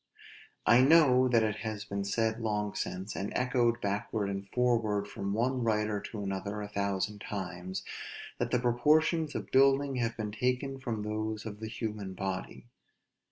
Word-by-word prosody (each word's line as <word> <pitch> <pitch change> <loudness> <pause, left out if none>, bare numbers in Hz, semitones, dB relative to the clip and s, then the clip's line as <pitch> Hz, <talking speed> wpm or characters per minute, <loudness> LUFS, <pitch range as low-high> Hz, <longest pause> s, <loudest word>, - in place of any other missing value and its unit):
I 120 +2 +7
know 130 -3 +6
that 115 -3 +4
it 110 -1 0
has 110 -1 -4
been 100 -1 -3
said 110 +2 0
long 105 -2 -1
since, 95 +3 -4
and 100 - -3
echoed 125 -2 +2
backward 100 0 -1
and 100 0 -5
forward 115 -5 +1
from 100 -1 -4
one 125 +3 +1
writer 105 -2 +1
to 105 -3 -6
another 100 +2 -3
a 105 - -4
thousand 100 0 -2
times, 95 -2 -5 0.6
that - - 0
the - - +2
proportions 150 +6 +2
of - - -5
building 135 0 +4
have 115 -1 -1
been 105 -2 -3
taken 125 +4 -1
from 115 -5 -3
those 110 +1 -3
of 105 -2 -6
the 110 - -5
human 105 -4 -4
body. 95 +2 -4
110 Hz, 160 wpm, -31 LUFS, 100-125 Hz, 0.6 s, I